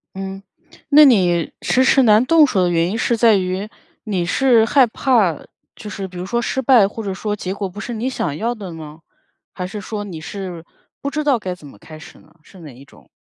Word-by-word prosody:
嗯， 195 0 -7 0.5
那 300 +1 +8
你 180 - +2
迟 260 - +2
迟 265 0 +4
难 215 +1 +5
动 315 +2 +5
手 195 -8 0
的 175 - +1
原 170 0 +1
因 215 - -3
是 235 0 0
在 225 -1 +5
于， 185 +2 -2 0.4
你 195 -6 -2
是 235 +5 +3
害 260 +3 +4
怕， 225 - +1 0.4
就 210 - -9
是 195 -2 -6
比 180 -1 -12
如 180 - -5
说 235 +5 -1
失 265 +2 -2
败 235 -6 +5
或 220 +2 -8
者 195 - -3
说 210 +2 -3
结 190 -2 -5
果 200 -1 -4
不 185 +3 -11
是 235 +2 -6
你 230 +4 -3
想 175 - -3
要 235 +2 -2
的 195 -7 -9
呢？ 155 -1 -10 0.5
还 180 - -5
是 205 +2 -7
说 205 +1 -5
你 170 -6 -8
是 180 -2 -7 0.4
不 280 - -3
知 305 +1 -3
道 275 -5 +2
该 185 -3 -5
怎 155 - -17
么 105 - -16
开 155 +6 -12
始 155 - -14
呢？ 155 - -23
是 190 - -17
哪 155 -4 -11
一 135 +3 -15
种？ 75 - -21
200 Hz, 250 characters per minute, -19 LUFS, 180-235 Hz, 0.5 s, 那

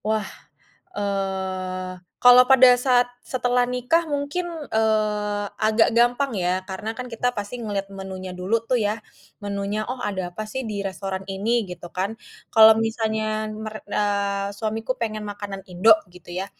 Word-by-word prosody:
Wah, 215 0 0 0.7
eee, 190 -2 -3 0.3
kalau 245 0 +9
pada 260 -1 +8 0.2
saat 245 -2 +5 0.2
setelah 245 -1 +1
nikah 250 +7 +1
mungkin, 290 +5 -2 0.2
eee, 210 -2 +1 0.2
agak 220 +1 +4
gampang 245 +3 +3
ya, 185 -1 -1
karena 190 +3 -4
kan 250 - -4
kita 245 +2 +1
pasti 205 +4 -5
ngelihat 200 -3 -3
menunya 190 -1 -7
dulu 180 +5 -1
tuh 255 - +3
ya 210 +1 0 0.5
menunya, 200 +1 -2
"Oh, 255 0 -4
ada 185 -3 -3
apa 215 - -4
sih 260 +4 -3
di 205 -1 -3
restoran 190 0 -4
ini?" 210 +2 0
gitu 180 -1 -8
kan. 195 +5 -2 0.4
kalau 220 -1 +9
misalnya 220 -1 -1
mer 215 0 -7
eee, 200 -1 0
suamiku 220 +2 -2
pengen 215 -2 -2
makanan 200 -1 -7
Indo 185 +5 +6 0.2
gitu 180 - -15
ya, 185 +2 -2
215 Hz, 150 wpm, -23 LUFS, 195-230 Hz, 0.7 s, kalau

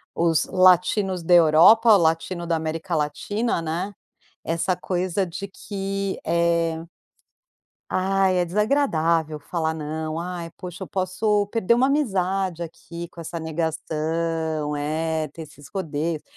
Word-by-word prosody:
os 165 -2 +2
latinos 185 +1 +3
da 175 - +2
Europa, 175 +8 +7
o - - +6
latino 170 +1 0
da 165 - +1
América 160 +2 -3
Latina, 170 +8 -1
né, 170 +5 -3 0.5
essa 170 +3 0
coisa 185 +1 -1
de 195 +4 -6
que, 195 0 -4
eh 170 -1 +1 1.1
"ai, 190 0 +2
é 180 - +2
desagradável 170 - +1
falar 160 +1 -2
'não'. 155 0 -4
Ai, 170 -1 -5
poxa, 180 +1 -8
eu - - -4
posso 205 +3 0
perder 225 0 +1
uma 250 +3 +3
amizade 195 - 0
aqui 170 +1 -8
com 175 - -21
essa 165 +1 -5
negação", 160 -1 -2
é, 155 +2 -1
ter 160 +4 -10
esses 145 -2 -13
rodeios. 160 -3 -2
170 Hz, 130 wpm, -23 LUFS, 160-190 Hz, 1.1 s, Europa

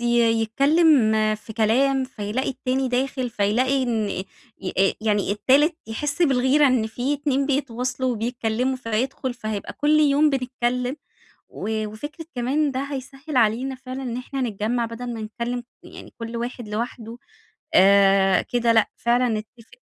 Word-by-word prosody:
ي - - -4 0.4
يتكلم 275 0 +4 0.2
في 215 +1 -10
كلام، 260 +5 +2
فيلاقي 245 0 -3
التاني 260 0 -1
داخل 255 0 -1
فيلاقي 250 +7 +1
إن 225 -4 0
أ 185 - -3 0.6
أ 195 0 +4
يعني 210 -3 0
التالت 285 +9 +3
يحسّ 290 +9 -2
بالغيرة 270 0 +4
إن 255 -4 +2
في 245 +6 -2
اتنين 280 -1 0
بيتواصلوا 255 -2 -1
وبيتكلموا 240 +2 -1
فهيدخل 250 +2 -2
فهيبقى 215 -4 -5
كل 300 +1 +2
يوم 295 +1 +4
بنتكلم، 250 0 -1 0.5
و 220 0 -3
وفكرة 290 +10 -8
كمان 275 +5 0
ده 260 0 -3
هيسهِّل 275 +1 -6
علينا 245 +4 +2
فعلًا 255 +1 -7
إن 240 -2 -4
إحنا 260 +2 -5
نتجّمع 230 +1 -1
بدل 240 +1 -6
ما 225 - -6
نتكلم 235 +3 -4 0.2
يعني - - -12
كل 230 0 -5
واحد 240 -1 -5
لوحده 230 +1 -5 0.6
آآ 195 -1 +5
كده 235 -1 +1
لأ، 225 -1 +3
فعلًا 245 +1 +2
نتفق 220 +1 -6
245 Hz, 140 wpm, -23 LUFS, 220-270 Hz, 0.6 s, آآ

